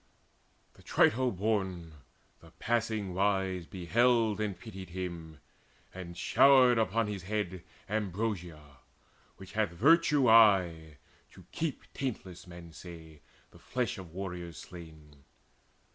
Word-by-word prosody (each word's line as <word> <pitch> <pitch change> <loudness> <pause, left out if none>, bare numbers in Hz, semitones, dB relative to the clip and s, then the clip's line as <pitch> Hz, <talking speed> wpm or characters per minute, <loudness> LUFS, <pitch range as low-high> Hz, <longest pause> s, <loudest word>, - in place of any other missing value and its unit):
The - - -20
Trito 130 +3 +2
born, 95 -5 -2 0.5
the 80 - -17
passing 110 -4 -1
wise, 95 -2 0
beheld 110 +4 +1
And 105 -3 -3
pitied 95 -6 -9
him, 85 -3 -7 0.5
and 90 -2 -9
showered 125 +4 +5
upon 110 +1 +1
his 105 -2 -5
head 95 -2 -3 0.2
Ambrosia, 90 -8 -4 0.6
which 95 0 -12
hath 110 -3 +1
virtue 145 - +4
aye 90 -9 +4 0.4
to - - -15
keep 160 -4 -3
Taintless, 95 -9 -5
men 85 -2 -11
say, 80 -1 -12 0.3
the - - -17
flesh 125 -5 -3
of 90 -4 -10
warriors 90 -3 -6
slain. 80 -4 -12
95 Hz, 115 wpm, -30 LUFS, 85-110 Hz, 0.6 s, showered